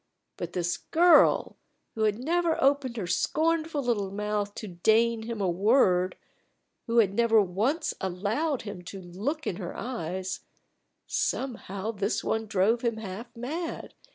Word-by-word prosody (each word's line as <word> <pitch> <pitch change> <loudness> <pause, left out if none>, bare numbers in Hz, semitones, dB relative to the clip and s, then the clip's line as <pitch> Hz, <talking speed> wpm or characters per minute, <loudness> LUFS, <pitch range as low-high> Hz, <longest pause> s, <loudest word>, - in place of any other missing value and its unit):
But - - -6
this 175 -1 -1
girl, 345 +1 +4 0.4
who 220 -1 0
had 210 -1 +1
never 330 +5 +1
opened 270 -3 +2
her 205 - -2
scornful 310 - 0
little 215 -6 0
mouth 205 0 -2
to 215 - -6
deign 220 +6 +2
him 225 0 -5
a 195 - +1
word 185 -1 +3 0.7
who 230 0 0
had 205 -4 +5
never 225 0 +4
once 215 - 0
allowed 215 - -1
him 200 -4 -7
to 195 - -7
look 205 - -4
in 175 - -2
her 180 -4 -6
eyes 190 -6 -4 0.7
somehow 220 -5 -2
this 205 0 -1
one 220 0 -1
drove 215 +3 +2
him 235 -2 0
half 220 +3 -7
mad. 315 +8 -5
220 Hz, 145 wpm, -28 LUFS, 190-255 Hz, 0.7 s, had